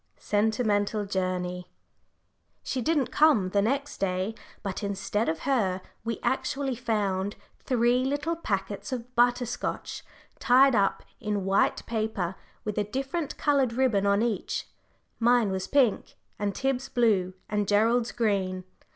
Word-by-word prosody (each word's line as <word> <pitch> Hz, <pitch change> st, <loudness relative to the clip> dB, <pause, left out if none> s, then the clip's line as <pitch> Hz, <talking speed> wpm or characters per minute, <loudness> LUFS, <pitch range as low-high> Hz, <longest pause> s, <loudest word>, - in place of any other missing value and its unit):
'" -, -, -43 dB, 0.2 s
Sentimental 210 Hz, -1 st, +1 dB
Journey. 180 Hz, -2 st, -2 dB, 1.0 s
She 260 Hz, -, -2 dB
didn't 295 Hz, -1 st, +1 dB
come 260 Hz, -12 st, +4 dB
the 200 Hz, -, +3 dB
next 275 Hz, +7 st, -1 dB
day, 190 Hz, +2 st, -1 dB, 0.3 s
but 195 Hz, 0 st, -3 dB
instead 200 Hz, +1 st, -1 dB
of 160 Hz, 0 st, -2 dB
her 215 Hz, -9 st, +1 dB, 0.2 s
we 230 Hz, 0 st, -3 dB
actually 270 Hz, 0 st, 0 dB
found 205 Hz, -5 st, -1 dB, 0.2 s
three 245 Hz, 0 st, +2 dB
little 290 Hz, +5 st, -1 dB
packets 205 Hz, -4 st, -3 dB
of 250 Hz, 0 st, -5 dB
butter 245 Hz, +1 st, +3 dB
scotch 235 Hz, -, -4 dB, 0.4 s
tied 265 Hz, +2 st, +5 dB
up 200 Hz, -3 st, +2 dB, 0.2 s
in 205 Hz, -2 st, -2 dB
white 195 Hz, +1 st, +2 dB
paper, 215 Hz, -6 st, -2 dB, 0.3 s
with 210 Hz, -1 st, -2 dB
a -, -, +2 dB
different 270 Hz, -, -3 dB
coloured 275 Hz, -5 st, +2 dB
ribbon 230 Hz, -6 st, +2 dB
on 200 Hz, +2 st, +3 dB
each: 230 Hz, -4 st, -2 dB, 0.5 s
mine 235 Hz, -3 st, +4 dB
was 190 Hz, 0 st, -2 dB
pink, 265 Hz, -6 st, +2 dB, 0.2 s
and 205 Hz, -1 st, -1 dB
Tib's 270 Hz, 0 st, -1 dB
blue, 200 Hz, -6 st, +2 dB
and 210 Hz, -1 st, -1 dB
Gerald's 225 Hz, +4 st, +3 dB
green. 195 Hz, -5 st, 0 dB
220 Hz, 135 wpm, -27 LUFS, 200-250 Hz, 1.0 s, tied